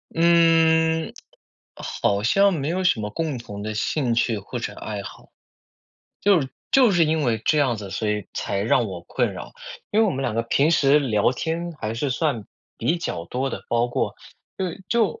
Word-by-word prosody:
嗯， 165 -1 +4 0.6
好 100 0 -1
像 195 - +4
没 145 -3 -2
有 185 +3 -1
什 180 -12 +2
么 105 - -3
共 155 +4 -3
同 105 -4 -8
的 110 +1 -4
兴 125 +3 0
趣 115 -2 +1
或 105 +5 -7
者 105 -3 -4
爱 105 -1 -5
好。 - - -11 0.9
就 200 -4 +4
是 135 - -4 0.2
就 255 -4 +5
是 175 -3 +4
因 155 0 +1
为 115 -3 0
这 155 - +3
样 130 -5 +2
子， 100 -2 -8
所 110 - -2
以 105 -3 -2
才 100 - -2
让 115 +3 +2
我 95 -4 -6
困 - - -1
扰， - - -8 0.4
因 210 - +1
为 225 - +5
我 - - +1
们 135 - -3
两 120 -5 -1
个 115 - +1
平 140 +6 +2
时 145 -2 +4
聊 115 -4 +2
天 165 +5 -3
还 110 +1 -3
是 135 +4 -2
算 130 -5 -1 0.3
比 165 - +1
较 165 - -4
多 130 +9 -2
的， - - -6
包 120 +1 +1
括 120 - -1 0.4
对， 185 -1 -4
就 235 - +1
135 Hz, 210 characters per minute, -23 LUFS, 110-165 Hz, 0.9 s, 就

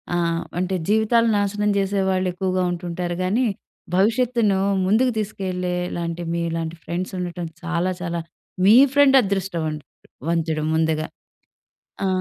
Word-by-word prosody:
ఆహ్, 170 -1 0 0.2
అంటే 185 +1 -1
జీవితాలు 220 +2 +3
నాశనం 205 +1 0
చేసే 195 0 0
వాళ్ళు 185 0 +1
ఎక్కువగా 185 0 -1
ఉంటుంటారు 175 0 -3
గానీ, 225 +8 +1 0.5
భవిష్యత్తును 225 -1 +2 0.3
ముందుకు 235 +6 +3
తీసుకెళ్లేలాంటి 180 -4 -3
మీలాంటి 165 -1 -2
ఫ్రెండ్స్ 180 +2 -4
ఉండటం 175 -1 -4 0.2
చాలా, 175 +2 0
చాలా 170 -1 -2 0.4
మీ 210 - +8 0.2
ఫ్రెండ్ 275 -2 +6
అదృష్టం 195 -4 -2
అం 155 - -4 0.5
వంతుడు 160 -2 0
ముందుగా. 160 -1 +1 1.0
ఆ! - - +2
185 Hz, 120 wpm, -22 LUFS, 170-205 Hz, 1.0 s, మీ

